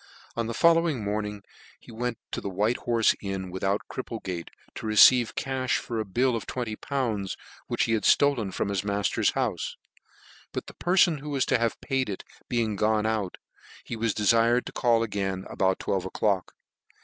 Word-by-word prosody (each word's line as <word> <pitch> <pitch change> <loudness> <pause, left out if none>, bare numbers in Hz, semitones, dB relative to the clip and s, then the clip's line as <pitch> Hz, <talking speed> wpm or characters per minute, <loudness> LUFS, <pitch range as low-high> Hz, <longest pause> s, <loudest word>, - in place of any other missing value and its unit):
On 115 -1 -1
the 115 - -3
fol, 170 0 +6
lowing 160 -9 0
morning 105 0 -3 0.4
he - - -14
went 120 +1 -3
to - - -3
the 100 - -4
White 105 +6 +1
Horfe 115 -2 +4
Inn 95 -2 -4
without 95 +2 0
Cripplegate, 95 -9 -5 0.2
to 110 - -6
receive 110 +1 +6
cafli 130 -1 0
for 115 -2 -4
a 110 - -1
bill 120 +5 +1
of 115 - -5
twenty 120 -4 -3
pounds 110 -8 -2 0.3
which - - 0
he - - 0
had 110 - +1
ftolen 130 -9 +3
from 100 - -2
his 100 -2 -1
matters' 100 -1 +1
houfe; - - -2 0.8
but - - -3
the - - -11
perfon 175 -3 +3
who 150 +2 -7
was 140 -3 +1
to - - +2
have 115 -1 0
paid 135 -4 -1
it 95 - -5 0.3
being 115 -3 0
gone 105 +1 +1
out, 110 -4 -1 0.5
he 115 - -4
was 115 -1 -1
defired 115 +3 +3
to - - -6
call 115 -2 +2
again 95 -3 -2
about 95 -1 +1
twelve 95 -2 -2
o'clock. 95 0 0
110 Hz, 185 wpm, -27 LUFS, 100-125 Hz, 0.8 s, fol